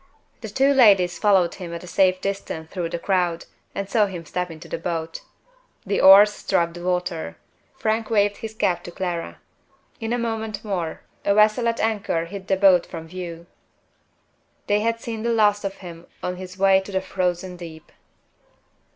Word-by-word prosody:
The 220 - -7
two 270 +7 +3
ladies 195 -9 +5
followed 190 -5 +3
him 180 -3 -8
at 170 - -8
a - - -10
safe 185 +1 +2
distance 195 -5 -4
through 175 -3 -3
the 170 - -3
crowd, 175 -2 0 0.3
and 200 0 -3
saw 210 +1 +2
him 175 -4 -7
step 180 +3 -3
into 165 +1 -10
the 165 - -4
boat. 165 -1 -4 0.6
The - - 0
oars 200 +2 +8
struck 170 -4 0
the 175 - -9
water; 180 - -2 0.4
Frank 220 0 -1
waved 205 -2 +2
his 220 -1 -7
cap 180 -5 0
to 175 - -7
Clara. 175 -2 -4 0.6
In 225 0 -4
a 245 - +1
moment 220 -2 -3
more 175 -6 -3 0.2
a 200 - +2
vessel 215 +3 +4
at 230 0 0
anchor 200 -7 0
hid 190 +2 -9
the 190 - +2
boat 190 -3 +5
from 165 -2 -8
view. 170 -2 -7 1.2
They 205 0 +2
had 230 +1 0
seen 225 -1 -5
the 235 - -1
last 210 -2 +3
of 195 0 -3
him 170 -1 -10 0.2
on 180 0 -3
his 185 0 -9
way 195 0 +5
to 190 +1 -9
the 190 -1 0
Frozen 180 -1 -2
Deep! 165 -2 -11
190 Hz, 180 wpm, -23 LUFS, 175-210 Hz, 1.2 s, oars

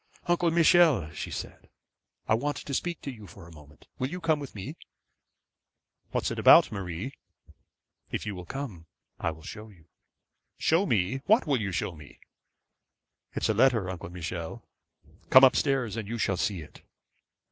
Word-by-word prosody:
'Uncle 175 -1 +2
Michel,' 165 - +4
she 80 - -6
said, - - -8 0.6
'I - - +3
want 140 +5 0
to 140 - -6
speak 170 +4 -2
to 140 - -5
you 110 -5 -12
for 85 0 -13
a - - -14
moment; 75 -1 -17
will 130 - -1
you 180 - -5
come 160 -3 +1
with 140 -5 -8
me?' 95 - -6 1.3
'What - - -1
is - - -1
it - - -4
about, - - +7
Marie?' 95 +6 -5 1.0
'If - - -4
you 105 - -3
will 90 -2 -9
come, 110 -12 -6 0.3
I - - 0
will 80 -1 -9
show 110 +5 -9
you.' 85 -6 -20 0.7
'Show 170 +5 +2
me! 105 +1 +1
What 220 +4 +4
will 140 -6 +1
you 100 -2 -2
show 90 - -2
me?' 75 -2 -14 1.2
'It's - - 0
a - - +3
letter, 115 -5 +3
Uncle 85 -2 -7
Michel. 85 -1 -6 0.6
Come 130 - +8
up 130 - +7
stairs 135 -7 0
and 110 -3 -4
you 115 +2 -4
shall 100 -3 0
see 95 0 -1
it.' 75 - -14
110 Hz, 175 wpm, -28 LUFS, 90-140 Hz, 1.3 s, Come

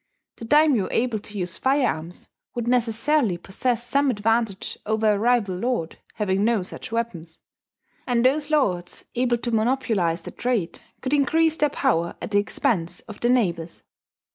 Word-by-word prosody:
The 230 - -8
daimyo 295 -5 +4
able 230 -2 0
to 205 0 -9
use 180 -2 -3
firearms 250 - 0 0.3
would 240 -1 -3
necessarily 240 - +2
possess 235 +7 -2
some 280 +3 +2
advantage 225 -2 0
over 220 0 +2
a 200 - -1
rival 225 -4 +2
lord 235 -6 -2 0.2
having 200 -2 0
no 225 -3 +2
such 185 - -9
weapons; 185 -9 -4 0.7
and 245 -1 +2
those 295 +3 +2
lords 185 - 0
able 245 -1 +1
to 235 0 -4
monopolize 220 -8 +1
the - - -7
trade 235 -9 -2 0.2
could 260 +2 -2
increase 320 +3 +3
their 295 - +2
power 225 - 0
at - - -6
the 205 - +4
expense 205 -4 -1
of 215 -3 -11
their 240 - +1
neighbours. 175 -9 0
230 Hz, 155 wpm, -24 LUFS, 190-255 Hz, 0.7 s, daimyo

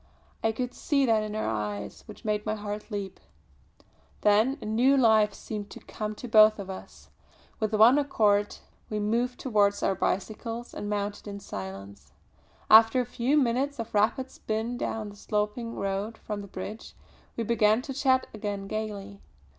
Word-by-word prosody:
I 225 - +3
could 250 +2 -4
see 280 -2 +1
that 225 -3 +3
in 215 0 -4
her 215 - -1
eyes 105 -2 -4
which - - -12
made 210 -1 0
my 215 0 -1
heart 210 0 -6
leap. 200 -3 -5 1.0
Then 215 +7 +3
a - - -8
new 245 +6 +3
life 220 -4 +4
seemed 210 -2 -6
to - - -10
come 215 0 -5
to 245 - -8
both 215 -1 +7
of 195 -2 -6
us. 190 - -11 0.5
With 215 -1 0
one 235 +6 +7
accord 210 -7 +2 0.3
we 215 - -2
moved 235 +4 0
towards 205 -5 +2
our - - +3
bicycles, 225 +5 -3
and 205 - -5
mounted 205 0 -3
in 200 0 -6
silence. 95 - -8 0.5
After 225 +3 +7
a 250 - +1
few 245 +5 0
minutes 275 +2 +1
of 230 -1 -6
rapid 230 +6 +1
spin 225 +2 -3
down 220 -3 -3
the 205 - -12
sloping 210 +3 -2
road 200 +3 -3
from 210 -1 -5
the 200 - -9
bridge, 200 +3 -8 0.4
we 230 - 0
began 220 +1 +3
to 270 - -5
chat 260 -1 +2
again 205 -2 -4
gaily. 205 -1 -5
215 Hz, 170 wpm, -28 LUFS, 205-235 Hz, 1.0 s, both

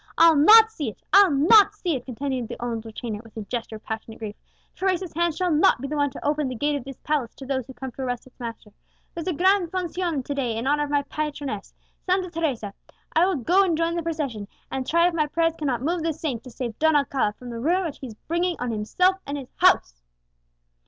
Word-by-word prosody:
I'll 330 -1 +7
not 440 +9 +8
see 295 - -3
it 215 - -14
I'll 395 0 +8
not 395 +9 +6
see 355 -6 -1
it," 255 - -6
continued 260 -1 -3
the - - -8
old 230 -2 -4
retainer 220 -1 -6
with 225 -1 -16
a - - -3
gesture 225 +1 -5
of 215 - -11
passionate 220 0 -6
grief; 215 -2 -6 0.4
"Teresa's 370 -2 -1
hand 340 -1 0
shall 360 0 0
not 315 +1 +4
be 275 - -4
the 300 - -3
one 285 -1 +2
to - - -10
open 295 -1 +1
the 255 - -4
gate 290 +5 0
of 280 - -4
this 270 -2 -8
palace 285 -6 -1
to 270 - -10
those 260 -2 -2
who 265 - -11
come 260 +1 -6
to 265 - -9
arrest 245 -2 -3
its 260 - -20
master! 230 -3 -7 0.4
There's 335 +1 -6
a 365 - +1
gran 375 +3 +3
foncion 345 -5 -2
to 285 - -3
day 250 -5 -2
in 230 - -3
honour 295 +2 +2
of - - -9
my 285 0 +1
patroness, 290 -7 -5 0.3
Santa 370 -1 0
Teresa; 275 - -2 0.4
I 335 +3 +5
will 385 - +1
go 345 +9 +3
and 340 -5 +1
join 335 +1 0
the 340 - -1
procession, 290 -11 -3 0.2
and 265 -1 -3
try 335 +1 +4
if 355 - -1
my 305 -2 +1
prayers 330 +2 +1
cannot 265 -6 -2
move 340 +3 0
the 325 0 0
saint 285 -7 -4
to - - -8
save 235 -2 -6
Don 315 0 +4
Alcala 275 -7 +1
from 245 +3 -10
the 230 - -5
ruin 350 +9 +1
which 310 - -5
he 265 - -7
is 220 - -10
bringing 345 +2 0
on 245 -1 -3
himself 360 - +1
and 285 +1 -3
his 265 -3 -9
house!" - - +3
290 Hz, 245 wpm, -24 LUFS, 245-335 Hz, 0.4 s, not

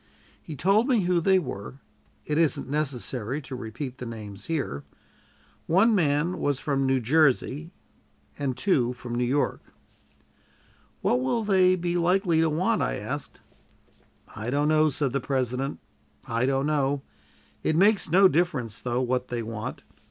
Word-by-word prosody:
He 155 - -8
told 200 - +3
me 245 -6 +3
who 175 -1 +1
they 190 +3 +4
were; 130 - -5 0.5
it 150 +1 0
isn't 165 -3 +1
necessary 135 -3 -2
to 130 - -7
repeat 125 +3 -6
the 125 - -5
names 105 -3 -8
here. 140 - -3 0.8
One 195 +8 +4
man 165 -1 +1
was 145 -2 0
from 135 -2 0
New 130 0 +2
Jersey 150 +3 +2 0.7
and 135 -3 -2
two 130 -5 +2
from 120 -1 -8
New 120 +1 0
York. 135 +4 0 1.4
"What 125 - +2
will 130 - 0
they 185 -3 +4
be 175 0 -1
likely 175 -1 +2
to 165 - +3
want?" 160 +5 +1
I - - 0
asked. - - -6 0.9
"I 110 +3 -4
don't 145 +3 +1
know," 155 0 +4
said 140 -2 -1
the 140 - +1
President; 130 +1 -2 0.5
"I 115 +2 0
don't 135 0 +1
know. 140 -2 0 0.6
It 155 - 0
makes 200 +1 +3
no 190 +4 +7
difference, 145 - -1
though, 125 0 -1
what 125 0 -1
they 120 -2 -3
want. 110 -1 -6
140 Hz, 150 wpm, -26 LUFS, 125-170 Hz, 1.4 s, no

